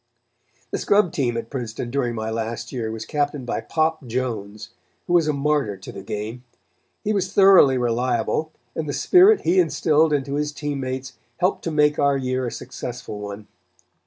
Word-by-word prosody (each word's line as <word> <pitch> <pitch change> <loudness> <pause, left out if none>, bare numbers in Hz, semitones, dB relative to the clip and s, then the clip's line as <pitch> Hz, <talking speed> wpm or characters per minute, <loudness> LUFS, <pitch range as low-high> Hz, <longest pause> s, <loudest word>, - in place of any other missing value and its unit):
The - - -2
scrub 200 -4 +3
team 120 -5 0
at 115 0 -6
Princeton 120 -2 -4
during 125 -3 -1
my 110 0 -3
last 115 +1 -4
year 115 -4 -3
was 110 0 -5
captained 145 -3 -2
by 120 - -2
Pop 160 -3 -1
Jones, 110 -4 -4 0.3
who 175 - -2
was 170 -3 +4
a - - +3
martyr 140 -7 0
to 95 - -10
the - - -8
game. 110 +5 -5 0.6
He 215 - 0
was 190 -2 -1
thoroughly 190 -10 +6
reliable, 125 +5 0 0.2
and 155 -2 -4
the - - -2
spirit 380 - +5
he 180 +3 +3
instilled 160 -2 +3
into 140 -1 -1
his 150 +1 -1
team 145 -1 -3
mates 130 -1 -5 0.2
helped 180 +2 0
to 165 - -1
make 150 -1 +3
our 140 -1 +3
year 130 -1 -1
a - - -4
successful 125 -3 -7
one. 105 0 -7
130 Hz, 180 wpm, -23 LUFS, 115-155 Hz, 0.6 s, thoroughly